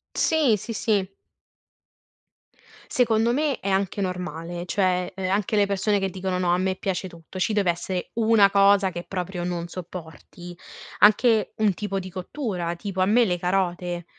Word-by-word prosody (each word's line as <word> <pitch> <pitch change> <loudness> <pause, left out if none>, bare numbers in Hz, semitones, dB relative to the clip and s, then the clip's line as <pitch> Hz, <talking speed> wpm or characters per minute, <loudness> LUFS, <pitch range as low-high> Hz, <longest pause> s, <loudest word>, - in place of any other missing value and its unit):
Sì, 305 -8 +3
sì, 230 - -7
sì. 200 -3 0 1.8
Secondo 230 -1 +2
me 290 -2 0
è 195 - -3
anche 195 +1 0
normale, 175 -2 -4
cioè, 180 -1 0
uhm, 190 -1 -3
anche 200 +2 0
le 205 -1 +4
persone 200 +1 0
che 195 0 -1
dicono: 185 0 -3
"No 175 -1 +1
a 180 - +2
me 190 0 0
piace 185 0 -3
tutto." 170 +2 -11
Ci 215 +4 +1
deve 200 -4 +2
esse 180 +1 -4
una 220 -3 +5
cosa 200 -1 +4
che 175 0 -6
proprio 180 -1 -4
non 175 -1 -3
sopporti, 175 0 -9 0.4
anche 215 +1 +4
un 215 -3 +2
tipo 195 0 -3
di 185 0 -7
cottura, 185 - -4
tipo 190 +1 -4
a - - +4
me 230 +5 +4
le 180 -4 0
carote 175 -1 -1
190 Hz, 165 wpm, -24 LUFS, 180-205 Hz, 1.8 s, una